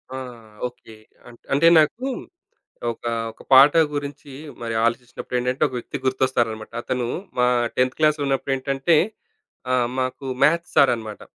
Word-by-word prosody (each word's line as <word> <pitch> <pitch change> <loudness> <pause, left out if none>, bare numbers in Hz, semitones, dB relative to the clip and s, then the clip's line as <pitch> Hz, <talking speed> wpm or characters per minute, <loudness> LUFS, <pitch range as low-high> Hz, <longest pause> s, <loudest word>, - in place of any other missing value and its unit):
ఆ! - - -4 0.5
ఓకే. 120 -2 -15 0.3
అంట్ 120 -1 -15
అంటే 150 +4 +4
నాకు 225 - +1 0.9
ఒక 115 - -8 0.3
ఒక - - -17
పాట 135 +2 +9 0.2
గురించి 145 0 -6 0.3
మరి 115 -1 -3
ఆలోచించినప్పుడేంటంటే, 125 +2 -2
ఒక 130 - -11
వ్యక్తి 140 - -6
గుర్తొస్తారన్నమాట. 125 -4 0
అతను 125 -1 -2 0.3
మా 125 - +4 0.3
10థ్ 150 +4 +2
ఉన్నప్పుడేంటంటే, 135 +3 0 0.7
ఆ 130 - +3 0.2
మాకు 130 +1 -3 0.2
మ్యాథ్స్ 170 +3 +3
సారనమాట. 115 -6 +2
130 Hz, 115 wpm, -22 LUFS, 120-140 Hz, 0.9 s, పాట